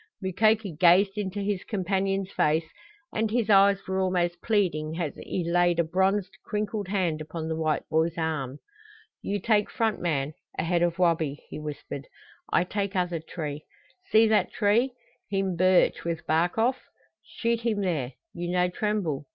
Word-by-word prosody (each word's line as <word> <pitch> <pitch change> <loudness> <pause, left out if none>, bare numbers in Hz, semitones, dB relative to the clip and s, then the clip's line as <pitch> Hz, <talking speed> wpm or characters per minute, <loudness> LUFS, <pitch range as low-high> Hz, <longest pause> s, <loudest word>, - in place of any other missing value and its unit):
Mukoki 210 +2 +2
gazed 185 +4 +5
into 205 -1 -3
his 200 -2 -1
companion's 195 -1 -1
face 155 +2 +2 0.5
and 220 0 0
his 225 -1 +1
eyes 195 0 +6
were 190 0 -1
almost 175 -2 0
pleading 165 -7 0
as 160 -5 -2
he 180 - -4
laid 175 0 +3
a 170 - +4
bronzed 190 +3 0
crinkled 210 -2 -3
hand 180 -5 0
upon 160 +1 -5
the 160 - -2
white 155 -1 -1
boy's 160 +1 +1
arm. 150 -5 -2 0.6
"You 205 +1 -2
take 210 +1 +2
front 220 -2 -1
man 150 -4 -1 0.2
ahead 170 +1 +1
of 175 -1 +1
Wabi," 160 -5 +1
he - - -6
whispered. 145 -2 -6 0.4
"I - - +4
take 200 +2 -3
other 180 -2 0
t'ree. 155 -2 -5 0.5
See 220 +1 +6
that 215 -1 +2
tree 230 +5 +2 0.4
heem 195 -2 0
birch, 185 +1 +3
with 170 -1 -3
bark 165 +5 +1
off? 250 +4 +2 0.4
Shoot 230 +1 -2
heem 220 -3 0
there. 155 -9 -1 0.2
You 175 0 -4
no 180 0 +2
tremble? 180 -8 -2
180 Hz, 160 wpm, -27 LUFS, 165-205 Hz, 0.6 s, eyes